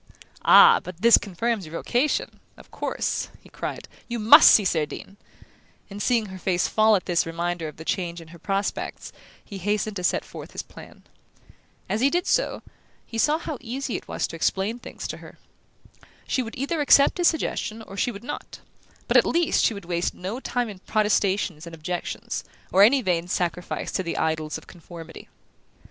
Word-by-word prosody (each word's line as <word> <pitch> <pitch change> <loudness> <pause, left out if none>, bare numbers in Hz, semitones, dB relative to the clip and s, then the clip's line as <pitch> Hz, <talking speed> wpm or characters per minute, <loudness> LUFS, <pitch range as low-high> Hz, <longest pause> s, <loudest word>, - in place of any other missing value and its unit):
"Ah, 465 0 +8
but 180 +1 -10
this 235 0 +8
confirms 205 0 -2
your 155 - -12
vocation 245 - -1 0.2
of - - -17
course," - - -2
he - - -19
cried, - - -6 0.2
"you 240 - -3
must 235 +8 +9
see 210 - +6
Cerdine!" 165 +3 -2 0.8
and, 200 +1 -6
seeing 235 -2 +2
her 190 -2 -9
face 180 0 0
fall 215 0 +4
at 185 - -2
this 170 -2 +1
reminder 170 0 -3
of 150 - -10
the 160 - -10
change 175 -2 -2
in 165 -1 -13
her 170 0 -13
prospects, 195 +3 -3 0.3
he 200 - -8
hastened 210 +2 -1
to 180 - -5
set - - +1
forth - - -10
his - - -5
plan. - - -14 0.8
As 215 - -1
he 275 - +4
did 350 +3 0
so, - - 0 0.4
he 225 - -5
saw 300 +6 +3
how 310 -5 -6
easy 250 +1 -4
it - - -6
was - - -2
to - - -7
explain 195 +7 -1
things - - -8
to - - -6
her. - - -14 0.9
She 260 - 0
would 230 -2 -7
either 290 +5 -2
accept 285 +3 +5
his 350 - +4
suggestion, 225 -8 -1
or 195 - -11
she 200 - 0
would 210 -2 -8
not: 295 - -7 0.5
but - - +4
at - - +7
least 340 -1 +1
she 225 - +2
would 200 -3 -9
waste 170 0 -2
no 195 +7 -5
time 245 -2 -2
in 200 -4 -9
protestations 195 -5 0
and 165 - -8
objections, 175 +2 -4 0.3
or 190 - +4
any 250 +6 +6
vain 175 -3 0
sacrifice 180 0 -2
to - - -1
the 170 -2 -4
idols 160 -1 -1
of - - -14
conformity. 170 -1 -12
200 Hz, 190 wpm, -24 LUFS, 175-240 Hz, 0.9 s, must